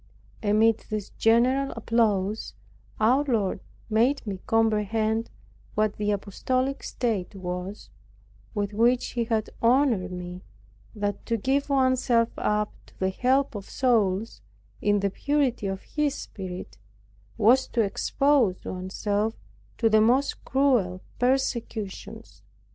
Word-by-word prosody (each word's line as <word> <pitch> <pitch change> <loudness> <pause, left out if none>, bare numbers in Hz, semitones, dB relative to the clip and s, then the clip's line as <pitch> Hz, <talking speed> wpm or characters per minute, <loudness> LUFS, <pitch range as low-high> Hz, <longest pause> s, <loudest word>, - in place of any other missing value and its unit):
Amid 220 +1 +3
this 215 -2 -4
general 255 +5 +3
applause, 215 -3 0 0.4
our 250 +6 +4
Lord 225 -9 0 0.3
made 235 +6 +2
me 195 -3 -4
comprehend 220 0 +1 0.5
what 215 -1 +1
the 210 0 -1
apostolic 255 +7 -1
state 210 -6 -2
was, 180 +2 -6 0.6
with 205 0 -1
which 240 +3 +2
He 235 -2 -1
had 220 -1 -1
honored 235 -6 +3
me; 180 0 -6 0.5
that 205 -1 -2
to 230 - +1
give 275 +6 0
one's 260 -2 +3
self 230 -2 +3
up 210 0 0
to - - -21
the 190 0 0
help 260 +7 +1
of 200 -3 -7
souls, 220 - +1 0.4
in 205 -1 +2
the 200 -1 0
purity 270 -3 0
of 195 0 -4
His 295 -2 -1
Spirit, 185 -2 -8 0.6
was 235 +4 +4
to 235 - 0
expose 235 0 +1
one's 185 +1 -5
self 210 +1 0 0.4
to 230 - +3
the 215 -1 +5
most 255 +6 +2
cruel 245 -10 +1 0.2
persecutions. 245 -5 -2
220 Hz, 125 wpm, -26 LUFS, 200-250 Hz, 0.6 s, the